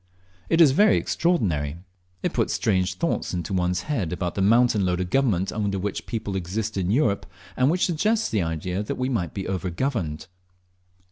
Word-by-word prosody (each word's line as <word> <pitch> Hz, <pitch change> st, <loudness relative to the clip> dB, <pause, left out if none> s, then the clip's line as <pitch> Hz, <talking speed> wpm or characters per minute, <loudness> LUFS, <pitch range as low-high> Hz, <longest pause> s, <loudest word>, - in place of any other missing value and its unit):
It 165 Hz, -, +4 dB
is 150 Hz, -5 st, +7 dB
very 205 Hz, +9 st, +5 dB
extraordinary! 85 Hz, -, 0 dB, 0.5 s
It -, -, -1 dB
puts -, -, 0 dB
strange 95 Hz, -4 st, +1 dB
thoughts 170 Hz, -, -1 dB
into 85 Hz, +1 st, -3 dB
one's 90 Hz, -1 st, 0 dB
head 115 Hz, -, -2 dB
about 90 Hz, 0 st, -2 dB
the 100 Hz, -, -2 dB
mountain 115 Hz, +1 st, +4 dB
load 90 Hz, -1 st, 0 dB
of 90 Hz, -1 st, -3 dB
government 105 Hz, -9 st, +2 dB
under 100 Hz, -2 st, -1 dB
which 100 Hz, +1 st, -4 dB
people 105 Hz, -4 st, -3 dB
exist 100 Hz, +4 st, -3 dB
in 95 Hz, -2 st, -1 dB
Europe, 110 Hz, -3 st, +1 dB, 0.3 s
and 145 Hz, +8 st, +2 dB
suggests 210 Hz, +7 st, +1 dB
the 105 Hz, -, 0 dB
idea 85 Hz, +3 st, -2 dB
that 105 Hz, -, -3 dB
we 130 Hz, +1 st, -2 dB
may 105 Hz, -10 st, 0 dB
be 95 Hz, +4 st, -6 dB
over 95 Hz, -1 st, -2 dB
governed. 90 Hz, -, -2 dB
100 Hz, 180 wpm, -24 LUFS, 90-130 Hz, 0.5 s, is